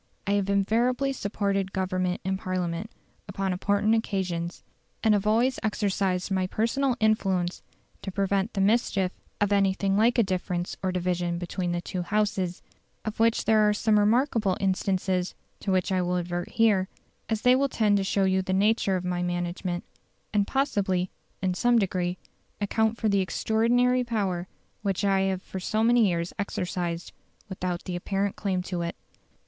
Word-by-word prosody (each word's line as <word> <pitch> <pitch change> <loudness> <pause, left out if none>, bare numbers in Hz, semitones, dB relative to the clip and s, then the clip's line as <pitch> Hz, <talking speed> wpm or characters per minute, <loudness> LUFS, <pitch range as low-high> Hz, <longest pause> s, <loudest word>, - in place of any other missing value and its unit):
I 200 - 0
have 200 -1 +1
invariably 240 +7 +2
supported 200 -4 -1
Government 185 -1 -1
in 190 +1 0
Parliament 185 +1 -3 0.4
upon 195 -1 -2
important 205 +4 +1
occasions, 185 -6 -2 0.4
and 220 -2 +5
have 205 0 +1
always 240 +5 +2
exercised 195 -3 0
my 185 -1 +1
personal 240 +6 0
influence 190 -5 +1 0.4
to 195 - -5
prevent 195 +2 0
the 195 - +1
mischief 195 -3 +2 0.3
of 205 -1 +1
anything 195 0 +2
like 230 +4 +3
a 235 - +5
difference 180 -2 -2
or 185 - 0
division 175 -1 -1
between 175 +1 -3
the 175 0 -1
two 180 +1 -4
Houses, 190 -2 -1 0.4
of 215 0 -4
which 230 0 +3
there 215 -1 +4
are 210 - +1
some 215 0 +3
remarkable 220 -2 +2
instances, 190 -1 0 0.2
to 195 - -2
which 185 0 +1
I 185 -1 +2
will 180 0 0
advert 175 0 -3
here, 210 -5 +3 0.4
as 220 -1 -1
they 250 0 +6
will 275 +1 +2
tend 210 -4 +2
to 195 - 0
show 195 +1 +1
you 190 0 +2
the 185 0 -2
nature 200 0 +2
of 180 -1 -3
my 180 -1 -1
management, 175 0 -2 0.5
and 205 -1 +2
possibly, 195 -9 0 0.3
in 185 -1 +1
some 240 +5 +3
degree, 185 -3 0 0.4
account 220 +2 +1
for 220 - 0
the 200 -1 +3
extraordinary 240 +6 +2
power 195 -7 -1 0.3
which 200 -1 -1
I 195 -1 +3
have 190 -1 0
for 190 - -6
so 215 +4 0
many 235 -1 +5
years 170 0 -2
exercised, 180 -3 -3 0.4
without 180 -2 -3
any 180 - -3
apparent 195 +2 -1
claim 185 -3 -1
to 180 -2 -3
it." 170 0 -3
195 Hz, 165 wpm, -27 LUFS, 180-215 Hz, 0.5 s, they